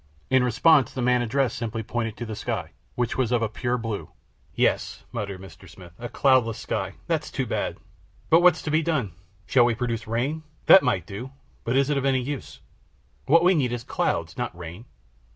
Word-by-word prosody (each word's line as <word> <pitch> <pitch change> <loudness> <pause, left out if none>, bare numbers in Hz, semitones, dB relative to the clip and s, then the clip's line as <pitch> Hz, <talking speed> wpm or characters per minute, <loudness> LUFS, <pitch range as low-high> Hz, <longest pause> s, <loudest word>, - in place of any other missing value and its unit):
In 130 -1 +5
response, 130 +2 +4
the 130 - -4
man 125 0 +3
addressed 120 +1 0
simply 115 -1 -4
pointed 115 0 -3
to 120 - -5
the 110 -1 -5
sky, - - -4 0.2
which 120 +2 -1
was 125 -3 +1
of 120 -2 +2
a - - +1
pure 120 +3 -1
blue. 115 -3 -4 0.5
"Yes," - - 0
muttered 100 -2 -4
Mr. 95 0 -13
Smith, 85 0 -14
"a 120 0 -5
cloudless 130 -5 +3
sky! - - -3
That's - - -1
too - - -2
bad, - - -2 0.5
but 165 +2 +7
what's 175 -2 +4
to 155 - -2
be 155 +1 +3
done? 150 - -1 0.3
Shall 120 +4 +4
we 120 -1 +1
produce 115 -1 -3
rain? 130 +8 -1 0.2
That 190 - +9
we - - -2
might 90 -4 +1
do, 120 +9 -7 0.3
but 120 - -1
is 140 +1 +2
it 140 - +2
of 135 - -3
any 135 -1 +3
use? 140 +2 -6 0.7
What 165 +3 +5
we 180 +2 +5
need 135 -8 +1
is 120 -1 -4
clouds, - - -1
not - - -3
rain. 90 +6 -9
120 Hz, 205 wpm, -25 LUFS, 110-135 Hz, 0.7 s, That